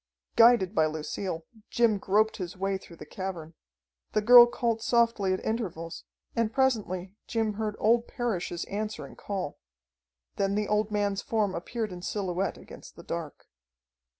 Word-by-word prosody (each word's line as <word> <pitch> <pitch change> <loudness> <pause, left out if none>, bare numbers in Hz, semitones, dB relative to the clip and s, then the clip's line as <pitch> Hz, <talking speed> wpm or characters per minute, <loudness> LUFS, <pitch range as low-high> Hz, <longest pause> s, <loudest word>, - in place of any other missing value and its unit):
Guided 230 -5 +6
by 155 -6 +3
Lucille, 160 +2 -4 0.2
Jim 230 -4 +2
groped 215 +3 +2
his 180 -1 -6
way 195 0 -1
through 170 - -14
the - - -10
cavern. 175 -4 -6 0.6
The 215 - +2
girl 240 +2 +10
called 230 -2 -1
softly 230 -5 +2
at 185 - -2
intervals, 175 -7 -4 0.3
and 230 -2 +1
presently 210 -8 0
Jim 225 -2 0
heard 210 0 -3
old 230 +2 +3
Parrish's 190 -9 -3
answering 210 +1 -5
call. 190 -7 -5 0.8
Then 195 0 +1
the 210 0 0
old 210 0 +1
man's 205 -2 0
form 210 -4 0
appeared 215 +5 -4
in 180 -1 -8
silhouette 190 -1 -2
against - - -13
the 170 - -12
dark. 165 -3 -6
205 Hz, 150 wpm, -28 LUFS, 185-225 Hz, 0.8 s, girl